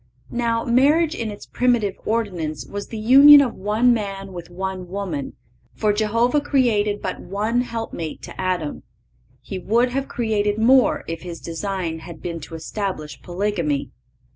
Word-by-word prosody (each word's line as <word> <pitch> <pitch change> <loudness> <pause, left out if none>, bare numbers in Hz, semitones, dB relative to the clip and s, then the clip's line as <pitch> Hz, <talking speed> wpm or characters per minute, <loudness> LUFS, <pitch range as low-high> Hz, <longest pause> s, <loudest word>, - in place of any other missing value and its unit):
Now, 230 -1 0
marriage 295 +7 +3
in 230 -8 -3
its 205 -1 -9
primitive 240 -5 +1
ordinance 185 -9 -2
was 205 0 -6
the 225 - -7
union 275 +7 +9
of 265 -4 +2
one 215 +5 +2
man 195 -3 -4
with 175 -1 -8
one 185 0 -5
woman, 180 -7 -4 0.4
for 210 -1 +1
Jehovah 230 +6 +2
created 220 -8 +1
but 185 - -3
one 215 +5 -1
helpmate 225 -10 -5
to - - -7
Adam. 180 -5 -2 0.6
He 190 +7 -5
would 235 +7 +2
have 270 +2 -2
created 210 -3 0
more, 250 +3 +4
if 165 0 -5
His 170 -2 -7
design 170 -1 -4
had 160 0 -10
been 170 -1 -5
to 165 +2 -9
establish 160 -2 -5
polygamy. 175 -6 -2
205 Hz, 150 wpm, -22 LUFS, 180-235 Hz, 0.6 s, union